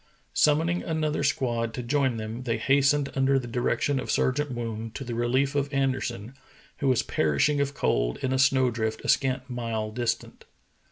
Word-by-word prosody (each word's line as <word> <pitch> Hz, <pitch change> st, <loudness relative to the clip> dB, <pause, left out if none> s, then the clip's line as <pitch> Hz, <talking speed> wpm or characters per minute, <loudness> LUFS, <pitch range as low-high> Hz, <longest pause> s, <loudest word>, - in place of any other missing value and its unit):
Summoning 165 Hz, +4 st, +2 dB
another 155 Hz, -3 st, -1 dB
squad 120 Hz, -6 st, 0 dB
to 125 Hz, -, -4 dB
join 130 Hz, -1 st, +1 dB
them, 110 Hz, +2 st, -5 dB
they 115 Hz, -3 st, -1 dB
hastened 140 Hz, +3 st, +2 dB
under 135 Hz, 0 st, +3 dB
the 130 Hz, -, -2 dB
direction 125 Hz, +3 st, 0 dB
of -, -, -6 dB
Sergeant 145 Hz, +3 st, +1 dB
Woon 115 Hz, -2 st, -4 dB
to 135 Hz, -, -5 dB
the 120 Hz, -2 st, -5 dB
relief 130 Hz, +4 st, +1 dB
of 140 Hz, 0 st, -1 dB
Anderson, 130 Hz, -4 st, -1 dB, 0.4 s
who 140 Hz, -, -1 dB
was 130 Hz, -3 st, +3 dB
perishing 80 Hz, -, +1 dB
of 140 Hz, 0 st, -2 dB
cold -, -, 0 dB
in 130 Hz, 0 st, 0 dB
a 130 Hz, -, +1 dB
snow 130 Hz, -1 st, +4 dB
drift 110 Hz, -1 st, -3 dB
a -, -, -3 dB
scant 130 Hz, -1 st, +1 dB
mile 115 Hz, -4 st, -3 dB
distant. 120 Hz, +1 st, -3 dB
130 Hz, 175 wpm, -26 LUFS, 115-140 Hz, 0.4 s, snow